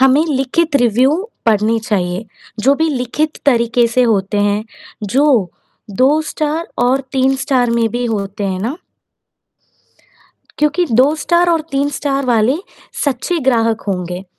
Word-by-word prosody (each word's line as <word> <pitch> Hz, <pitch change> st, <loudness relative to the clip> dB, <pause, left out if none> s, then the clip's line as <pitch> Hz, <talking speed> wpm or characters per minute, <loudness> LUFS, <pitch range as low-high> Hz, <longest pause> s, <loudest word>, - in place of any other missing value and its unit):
हमें 265 Hz, +4 st, +4 dB
लिखित 285 Hz, +3 st, 0 dB
रिव्यू 245 Hz, +3 st, +3 dB, 0.3 s
पढ़ने 220 Hz, +1 st, +2 dB
चाहिए। 185 Hz, -2 st, -2 dB, 0.4 s
जो 270 Hz, +6 st, +4 dB
भी 320 Hz, +3 st, 0 dB
लिखित 285 Hz, +4 st, -2 dB
तरीके 235 Hz, -2 st, +3 dB
से 250 Hz, +2 st, +2 dB
होते 205 Hz, -3 st, +1 dB
हैं, 205 Hz, +1 st, 0 dB, 0.4 s
जो 240 Hz, -, +2 dB, 0.5 s
दो 285 Hz, +5 st, +4 dB
स्टार 310 Hz, +2 st, -2 dB, 0.2 s
और 260 Hz, +2 st, +2 dB
तीन 265 Hz, 0 st, +2 dB
स्टार 260 Hz, -3 st, +1 dB
में 235 Hz, -1 st, +1 dB
भी 245 Hz, +1 st, -2 dB
होते 200 Hz, -2 st, -3 dB
हैं 190 Hz, -1 st, -2 dB
ना, 245 Hz, -, -3 dB, 2.2 s
क्योंकि 265 Hz, +6 st, +4 dB
स्टार 345 Hz, +2 st, +2 dB
और 330 Hz, -1 st, +2 dB
तीन 280 Hz, +1 st, +1 dB
स्टार 275 Hz, -1 st, -2 dB
वाले 240 Hz, +3 st, +2 dB, 0.5 s
सच्चे 285 Hz, +6 st, -1 dB
ग्राहक 225 Hz, -2 st, +2 dB
होंगे 180 Hz, -1 st, -3 dB
245 Hz, 135 wpm, -16 LUFS, 215-280 Hz, 2.2 s, हमें